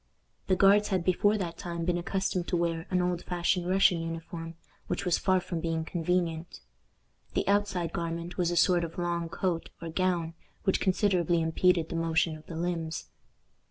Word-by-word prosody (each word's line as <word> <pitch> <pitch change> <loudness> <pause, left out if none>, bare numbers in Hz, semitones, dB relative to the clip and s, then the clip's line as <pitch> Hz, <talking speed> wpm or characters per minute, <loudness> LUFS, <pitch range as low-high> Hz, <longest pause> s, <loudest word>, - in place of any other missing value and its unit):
The 185 - +3
Guards 200 +2 +5
had 190 -4 0
before 205 +4 +3
that 170 -4 -4
time 170 -1 -4
been 175 0 +1
accustomed 185 0 -1
to 180 - +1
wear 170 0 -1
an 180 -1 +2
old 180 -1 -1
fashioned 180 0 0
Russian 185 -2 +4
uniform, 165 0 -6 0.3
which - - -2
was 175 -2 +2
far 185 -1 +3
from 175 -2 -4
being 165 -1 -1
convenient. 170 -1 -1 0.7
The - - 0
outside 195 -4 +1
garment 170 +1 -3
was 175 -2 +1
a 175 - -1
sort 175 0 +4
of 165 0 -6
long 170 -1 -1
coat 175 -1 -2
or 165 - -6
gown, 170 -1 0 0.3
which 190 - +2
considerably 180 -3 +2
impeded 165 +1 +2
the - - -4
motion 165 -1 +1
of 155 0 -14
the 165 - -7
limbs. 165 -2 -3
175 Hz, 175 wpm, -29 LUFS, 165-185 Hz, 0.7 s, Guards